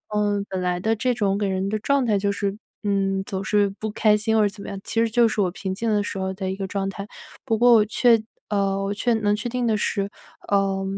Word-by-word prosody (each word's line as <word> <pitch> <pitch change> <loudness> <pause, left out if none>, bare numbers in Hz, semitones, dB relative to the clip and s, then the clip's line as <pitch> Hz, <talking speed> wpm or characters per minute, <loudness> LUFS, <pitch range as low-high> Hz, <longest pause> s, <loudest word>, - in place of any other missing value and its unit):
嗯， 205 -1 +1
本 190 -1 -3
来 180 0 0
的 220 +4 +1
这 250 +3 0
种 200 -4 0
给 205 - 0
人 190 0 -1
的 215 - 0
状 280 +4 +1
态 210 -3 +2
就 200 0 0
是， 200 0 -2 0.3
嗯， 195 -1 0
总 190 -1 -4
是 205 0 +2
不 220 - -3
开 210 0 +3
心 220 +1 0
或 220 - +4
者 205 - +3
怎 200 0 -12
么 - - -8
样， 195 - -5
其 225 - -2
实 230 - +3
就 235 0 +4
是 215 - -3
我 180 -3 +1
平 190 0 -4
静 225 +3 -2
的 210 -1 +2
时 200 - -5
候 190 0 -2
的 190 0 -4
一 190 - -2
个 195 -1 -4
状 195 0 -2
态。 200 0 -7 0.4
不 225 -3 +1
过 240 +1 +6
我 215 -2 +6
确 230 +2 +4 0.3
呃， 195 -1 0
我 195 - -2
确 235 +3 +1
能 210 -2 +1
确 220 +3 -4
定 245 0 -2
的 215 -1 +2
是， 200 -1 -1 0.4
呃， 195 -1 +1
205 Hz, 285 characters per minute, -23 LUFS, 195-220 Hz, 0.4 s, 过